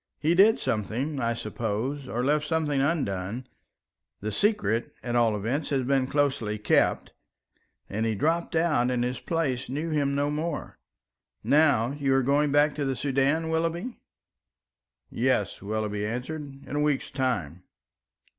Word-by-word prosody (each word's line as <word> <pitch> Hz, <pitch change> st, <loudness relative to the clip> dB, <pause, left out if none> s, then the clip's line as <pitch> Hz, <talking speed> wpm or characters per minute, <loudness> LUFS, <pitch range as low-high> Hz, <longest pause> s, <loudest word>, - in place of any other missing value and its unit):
He 160 Hz, +3 st, +2 dB
did 200 Hz, +5 st, +6 dB
something, 125 Hz, +7 st, -2 dB
I 115 Hz, -1 st, 0 dB
suppose, 115 Hz, +5 st, -3 dB
or 120 Hz, 0 st, -2 dB
left 150 Hz, +1 st, +1 dB
something 150 Hz, -4 st, +1 dB
undone, 120 Hz, -, -1 dB, 0.7 s
the 105 Hz, +2 st, -3 dB
secret, 200 Hz, -, 0 dB
at 120 Hz, -1 st, -2 dB
all 115 Hz, -3 st, +3 dB
events, 125 Hz, +9 st, -2 dB
has 135 Hz, -2 st, +1 dB
been 135 Hz, 0 st, +1 dB
closely 135 Hz, -7 st, 0 dB
kept, 105 Hz, -, +1 dB, 0.7 s
and 105 Hz, +3 st, -2 dB
he 110 Hz, -1 st, 0 dB
dropped 165 Hz, +10 st, 0 dB
out, 155 Hz, -7 st, +2 dB
and 125 Hz, -1 st, 0 dB
his 125 Hz, 0 st, -2 dB
place 145 Hz, -8 st, -2 dB
knew 155 Hz, +5 st, -3 dB
him 140 Hz, -2 st, +1 dB
no 145 Hz, +1 st, +1 dB
more. 155 Hz, +1 st, -4 dB, 0.6 s
Now 140 Hz, -6 st, +4 dB
you 140 Hz, -2 st, +1 dB
are 135 Hz, -, +3 dB
going 145 Hz, +2 st, +2 dB
back 145 Hz, +1 st, +4 dB
to 145 Hz, -, -1 dB
the 135 Hz, -1 st, -1 dB
Soudan, 140 Hz, +5 st, +1 dB
Willoughby?" 165 Hz, +8 st, -2 dB, 1.1 s
"Yes," 120 Hz, -7 st, 0 dB
Willoughby 105 Hz, 0 st, -2 dB
answered, 135 Hz, +5 st, -5 dB
"in 145 Hz, -, -5 dB
a -, -, +1 dB
week's 150 Hz, -2 st, 0 dB
time." 110 Hz, -, -2 dB
135 Hz, 145 wpm, -27 LUFS, 115-150 Hz, 1.1 s, did